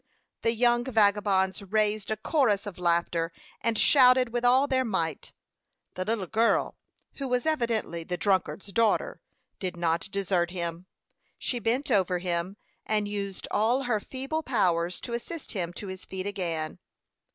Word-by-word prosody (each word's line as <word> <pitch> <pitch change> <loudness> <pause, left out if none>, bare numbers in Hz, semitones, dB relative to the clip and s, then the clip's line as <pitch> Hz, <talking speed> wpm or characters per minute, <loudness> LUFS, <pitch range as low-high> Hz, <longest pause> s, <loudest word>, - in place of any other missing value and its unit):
The 230 - +2
young 240 +1 +3
vagabonds 205 -5 +2
raised 210 +1 0
a 220 - -1
chorus 220 -5 +1
of 200 -3 -7
laughter, 170 -1 +1 0.3
and 230 -1 +1
shouted 255 -1 +6
with 240 +1 -2
all 255 +3 +5
their 260 -2 +1
might. 165 - -2 0.6
The 185 - -3
little 215 -1 -1
girl, 225 +5 +1 0.4
who 275 - -3
was 250 +1 0
evidently 230 - 0
the 180 +2 -3
drunkard's 195 +1 0
daughter, 230 0 +1 0.4
did 185 -2 -4
not 170 +2 0
desert 190 -3 0
him. 170 0 -5 0.5
She 245 - -2
bent 245 +5 0
over 185 -4 +3
him, 175 +2 -2 0.3
and 210 -1 0
used 200 -2 -4
all 240 +6 +2
her 240 -4 +1
feeble 270 +8 -4
powers 180 - +1
to 235 - -6
assist 295 +7 -5
him 175 -5 -2
to 205 - -7
his 190 -1 -7
feet 190 0 -6
again. 170 -6 -3
205 Hz, 150 wpm, -28 LUFS, 180-240 Hz, 0.6 s, shouted